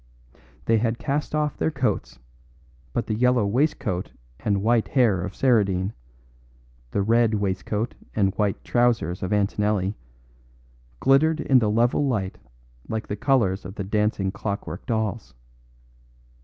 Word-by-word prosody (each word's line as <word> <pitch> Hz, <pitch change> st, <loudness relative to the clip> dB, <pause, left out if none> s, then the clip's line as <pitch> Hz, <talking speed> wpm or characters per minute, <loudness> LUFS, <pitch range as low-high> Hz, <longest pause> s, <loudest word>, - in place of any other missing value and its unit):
They 115 Hz, -1 st, +3 dB
had 115 Hz, +1 st, 0 dB
cast 145 Hz, +3 st, -2 dB
off 150 Hz, -1 st, 0 dB
their 80 Hz, -, +1 dB
coats, 65 Hz, -, -2 dB, 0.7 s
but 115 Hz, -, -1 dB
the 110 Hz, -, -2 dB
yellow 125 Hz, 0 st, +3 dB
waistcoat 100 Hz, -, 0 dB, 0.3 s
and 100 Hz, -2 st, 0 dB
white 115 Hz, 0 st, +2 dB
hair 115 Hz, -9 st, +3 dB
of 95 Hz, +1 st, -5 dB
Saradine, 100 Hz, -6 st, +2 dB, 1.0 s
the 100 Hz, -, 0 dB
red 115 Hz, +1 st, +3 dB
waistcoat 105 Hz, +3 st, -2 dB, 0.2 s
and 95 Hz, -3 st, +2 dB
white 100 Hz, -1 st, -1 dB
trousers 115 Hz, -8 st, +1 dB
of 90 Hz, -, -3 dB
Antonelli, 105 Hz, -1 st, +1 dB, 1.1 s
glittered 155 Hz, +4 st, +4 dB
in 135 Hz, -4 st, +4 dB
the 110 Hz, -3 st, +1 dB
level 120 Hz, +6 st, +2 dB
light 100 Hz, -7 st, -2 dB, 0.5 s
like 110 Hz, -1 st, -2 dB
the 105 Hz, -, -1 dB
colours 105 Hz, -5 st, +1 dB
of 95 Hz, +3 st, -8 dB
the 100 Hz, -, -3 dB
dancing 105 Hz, -1 st, 0 dB
clockwork 100 Hz, -2 st, -5 dB
dolls. 110 Hz, -, -2 dB
105 Hz, 130 wpm, -24 LUFS, 95-120 Hz, 1.1 s, glittered